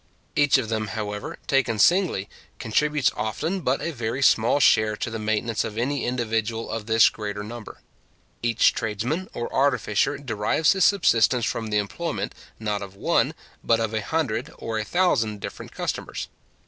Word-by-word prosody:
Each 145 -1 +5
of 130 -4 -2
them, 110 -1 -2
however, 105 -1 -4
taken 130 -5 +1
singly, 170 - +3 0.3
contributes 150 +6 +1
often 155 - -2
but 130 -3 0
a 170 - -1
very 120 -1 -3
small 115 +3 +4
share 110 -5 +4
to 115 - -3
the 115 - -4
maintenance 110 +1 0
of 110 -1 -6
any 135 +3 -1
individual 115 -2 -2
of 115 -1 -4
this 115 0 +6
greater 105 -1 -4
number. 115 +1 -9 0.6
Each 115 -1 +3
tradesman 120 - -2
or 120 - -4
artificer 130 0 +1
derives 130 +3 +1
his 190 -1 +3
subsistence 125 - +3
from 110 +1 -2
the 105 -1 0
employment, 100 -3 -3 0.2
not 105 -2 -2
of 100 -1 -8
one, - - +1 0.3
but 115 -1 +3
of 110 -1 -1
a 110 - 0
hundred 130 -7 -2
or 110 -1 -3
a - - -1
thousand 115 - +1
different - - -7
customers. - - -4
115 Hz, 160 wpm, -24 LUFS, 110-135 Hz, 0.6 s, this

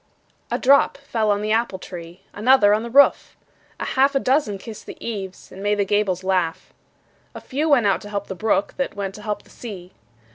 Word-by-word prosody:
A - - 0
drop 275 +2 +4
fell 230 -6 -2
on 205 0 +1
the 215 - -1
apple 225 -3 +1
tree, 175 -1 -10
Another 215 -1 +5
on 215 - +1
the 235 - -6
roof; 280 +4 +4 0.4
A - - -3
half 275 +2 +2
a - - +4
dozen 260 -6 +1
kissed 215 +2 -10
the - - -8
eaves, 195 -5 -6
And 190 - -10
made 205 +1 +1
the 200 - +1
gables 195 -2 0
laugh. 185 -3 -1 0.6
A - - -6
few 295 +4 -2
went 265 -7 +4
out 195 -2 +2
to 205 - -10
help 200 -1 -3
the - - -6
brook, 205 0 0
That 275 - -2
went 195 -1 -4
to 210 - -11
help 210 -1 -4
the - - -21
sea. 190 -6 -9
210 Hz, 215 wpm, -22 LUFS, 195-240 Hz, 0.6 s, Another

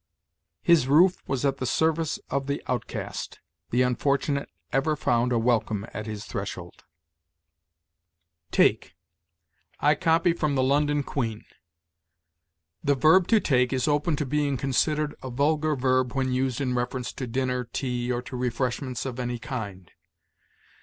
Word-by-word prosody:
"His 165 -7 +4
roof 175 +7 +5
was 135 0 -1
at 135 -1 +1
the 130 - -3
service 160 +1 +1
of 140 0 -1
the 140 - -2
outcast; 125 -3 -4 0.3
the 125 +2 +3
unfortunate 140 +3 0 0.2
ever 140 +4 +2
found 125 -3 +1
a 120 - +2
welcome 115 -3 +1
at 105 +2 -5
his 105 0 -6
threshold." 90 -5 -6 1.6
TAKE. - - +2 0.8
I 150 - +4
copy 165 +2 +2
from 155 -4 -1
the 130 - +2
"London 145 +2 +2
Queen": 115 -6 -3 1.4
"The 145 -2 +3
verb 160 +7 +5
to 225 - +5
take 125 -8 +2
is 130 0 0
open 150 +2 +1
to 145 - -2
being 145 0 0
considered 150 +3 0
a 130 - -6
vulgar 150 +4 +1
verb 130 -1 +1
when 130 -2 0
used 130 -1 0
in 130 -3 -1
reference 125 0 -2
to 130 - -5
dinner, 125 +1 -1
tea, 125 0 -3
or 120 0 -2
to 130 0 -8
refreshments 125 +1 -2
of 130 -1 -5
any 120 -1 -2
kind. 110 - -6
130 Hz, 145 wpm, -26 LUFS, 125-145 Hz, 1.6 s, roof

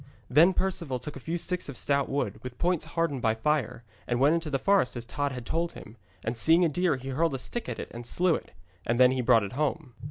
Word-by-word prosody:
Then 170 +7 +6
Perceval 170 -8 -1
took 135 +4 -7
a - - -7
few 165 +6 -3
sticks 180 -2 -1
of 135 - -5
stout 140 +2 +1
wood, 140 +1 -2
with 125 -1 -8
points 175 -1 0
hardened 165 -5 -1
by 110 -1 +2
fire, 130 -1 -1 0.2
and 120 0 0
went 140 +4 +5
into 165 -2 -1
the 140 - 0
forest 185 - +2
as 120 - -6
Tod 145 +4 -2
had 125 -2 -7
told 170 +4 -1
him, 105 - -11 0.3
and 110 +2 -1
seeing 165 +8 +4
a - - +2
deer 175 0 +1
he 130 +1 -7
hurled 155 +2 0
a - - -2
stick 235 - -4
at - - -4
it - - -7
and 120 +1 -8
slew 180 +6 +3
it. - - -4 0.3
And 120 +1 -1
then 125 0 +7
he 130 -1 0
brought 115 -2 +4
it 100 - -5
home. 150 -1 -2
140 Hz, 255 wpm, -28 LUFS, 125-165 Hz, 0.3 s, then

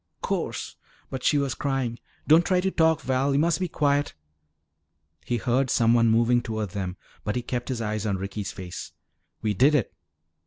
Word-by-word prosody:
"'Course!" - - -3 0.3
But 130 - -4
she 150 - +3
was 140 -2 0
crying. 135 -4 -2 0.3
"Don't 160 +3 +7
try 185 0 +2
to 190 +1 0
talk, 160 -2 +3
Val. 135 +1 +1
You - - +2
must 165 0 +2
be 185 - 0
quiet." 145 - 0 1.1
He 120 - 0
heard 125 +3 +1
someone 115 0 +4
moving 120 +2 +3
toward 110 -4 -4
them 95 -1 -4 0.3
but 105 - -2
he 125 - -1
kept 120 +1 -3
his 125 -3 -2
eyes 110 0 -2
on 100 -2 0
Ricky's 100 +2 -4
face. 90 -2 -8 0.5
"We 105 -1 +1
did 135 +9 +4
it!" 130 - 0
125 Hz, 180 wpm, -26 LUFS, 110-145 Hz, 1.1 s, Don't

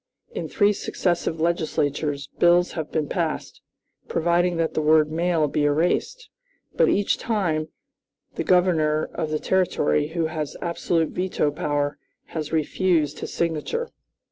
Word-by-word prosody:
In - - -5
three 205 0 +3
successive 175 -4 -1
legislatures, 150 -3 -1
bills 175 +1 +4
have 160 -2 -5
been 155 -2 -1
passed, 165 -2 -3 0.5
providing 175 +1 +1
that 165 -1 0
the - - 0
word 155 0 +4
'male' 165 -1 +1
be 145 +1 0
erased; 175 - 0 0.5
but, - - +3
each 205 - +1
time, 170 -9 -1 0.7
the - - -3
Governor 160 -4 +2
of 155 - -2
the 155 - 0
Territory, 165 -5 +1
who 165 +1 -1
has 155 -2 -4
absolute 170 -1 0
veto 180 -5 -1
power, 145 0 -2 0.3
has 155 -2 -4
refused 160 -1 +1
his - - -5
signature. 170 - -2
160 Hz, 135 wpm, -24 LUFS, 150-175 Hz, 0.7 s, bills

